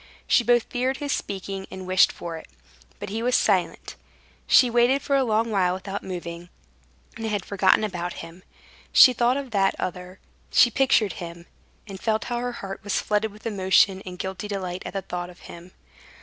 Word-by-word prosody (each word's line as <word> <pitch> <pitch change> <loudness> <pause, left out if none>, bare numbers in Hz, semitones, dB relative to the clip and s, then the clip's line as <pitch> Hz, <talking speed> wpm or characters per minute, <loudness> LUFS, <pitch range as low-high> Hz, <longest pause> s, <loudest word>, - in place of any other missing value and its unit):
She 240 - +3
both 240 -1 +3
feared 255 +2 -2
his 285 -1 -3
speaking 195 -3 -4
and 190 0 -8
wished 185 +1 +4
for 170 -1 -7
it. 160 - -10 0.5
But - - -7
he 220 +3 -3
was 250 +1 +1
silent. - - 0 0.5
She 255 - +6
waited 240 +3 +2
for 280 - +1
a 270 - +3
long 225 -1 0
while 185 -3 +1
without 195 +1 -6
moving, 175 -1 -7 0.7
and 225 -1 -4
had 205 -3 -2
forgotten 195 +1 +3
about 180 -4 -3
him. 165 +2 -14 0.5
She 255 - +8
thought 245 +2 +2
of 275 -3 -6
that 195 -2 +2
other; 180 +1 -6 0.3
she 240 - +5
pictured 235 -6 +2
him, 170 0 -8 0.4
and 195 -3 -9
felt 220 +1 0
how 240 -1 -3
her 245 0 -3
heart 195 -4 -7
was 205 -1 -1
flooded 210 +1 -1
with 210 +1 -17
emotion 190 -2 +2
and 180 -1 -8
guilty 190 +2 -5
delight 185 -3 -4
at - - -8
the 195 -1 -3
thought 175 0 -5
of 180 - -16
him. 170 +2 -12
195 Hz, 190 wpm, -24 LUFS, 185-230 Hz, 0.7 s, She